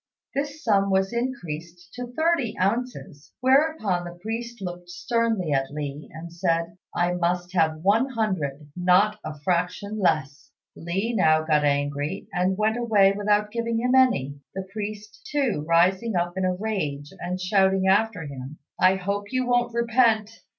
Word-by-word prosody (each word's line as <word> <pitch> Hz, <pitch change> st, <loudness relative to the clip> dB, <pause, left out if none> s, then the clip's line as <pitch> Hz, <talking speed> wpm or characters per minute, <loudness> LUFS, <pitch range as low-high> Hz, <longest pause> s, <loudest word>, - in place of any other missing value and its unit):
This 285 Hz, +2 st, -3 dB
sum 200 Hz, -3 st, +3 dB
was 190 Hz, +3 st, +1 dB
increased 175 Hz, -8 st, -5 dB
to 245 Hz, 0 st, -5 dB
thirty 315 Hz, -6 st, +1 dB
ounces, 195 Hz, -, -2 dB
whereupon 260 Hz, -, +2 dB
the 175 Hz, 0 st, -8 dB
priest 230 Hz, +4 st, -5 dB
looked 175 Hz, -2 st, -7 dB
sternly 225 Hz, -3 st, -1 dB
at 135 Hz, -1 st, +1 dB
Li 145 Hz, 0 st, -6 dB
and 165 Hz, +1 st, -9 dB
said, 170 Hz, -1 st, -1 dB, 0.2 s
"I 175 Hz, 0 st, +1 dB
must 175 Hz, +1 st, -1 dB
have 160 Hz, -3 st, +1 dB
one 220 Hz, +7 st, +3 dB
hundred; 160 Hz, -, -2 dB
not 185 Hz, +4 st, +3 dB
a 150 Hz, -1 st, -7 dB
fraction 180 Hz, +5 st, -1 dB
less." 155 Hz, -6 st, 0 dB, 0.3 s
Li 190 Hz, +8 st, -2 dB
now 155 Hz, -6 st, +3 dB
got 155 Hz, -2 st, +2 dB
angry, 145 Hz, 0 st, -1 dB
and 185 Hz, +1 st, +1 dB
went 215 Hz, +2 st, +1 dB
away 210 Hz, -5 st, +4 dB
without 205 Hz, +1 st, +1 dB
giving 230 Hz, 0 st, -1 dB
him 250 Hz, +2 st, +1 dB
any, 145 Hz, -, +3 dB, 0.2 s
the 190 Hz, 0 st, -5 dB
priest, 215 Hz, 0 st, -7 dB
too, 260 Hz, -, 0 dB
rising 185 Hz, +6 st, +3 dB
up 175 Hz, 0 st, 0 dB
in 190 Hz, 0 st, 0 dB
a 185 Hz, 0 st, +1 dB
rage 155 Hz, -9 st, -3 dB
and 180 Hz, +1 st, -3 dB
shouting 190 Hz, 0 st, +2 dB
after 205 Hz, -2 st, +2 dB
him, 140 Hz, 0 st, -8 dB, 0.2 s
"I 185 Hz, +1 st, +5 dB
hope 200 Hz, +2 st, -3 dB
you 255 Hz, -1 st, 0 dB
won't 245 Hz, -1 st, +1 dB
repent." 230 Hz, -2 st, +2 dB
190 Hz, 155 wpm, -25 LUFS, 170-225 Hz, 0.3 s, I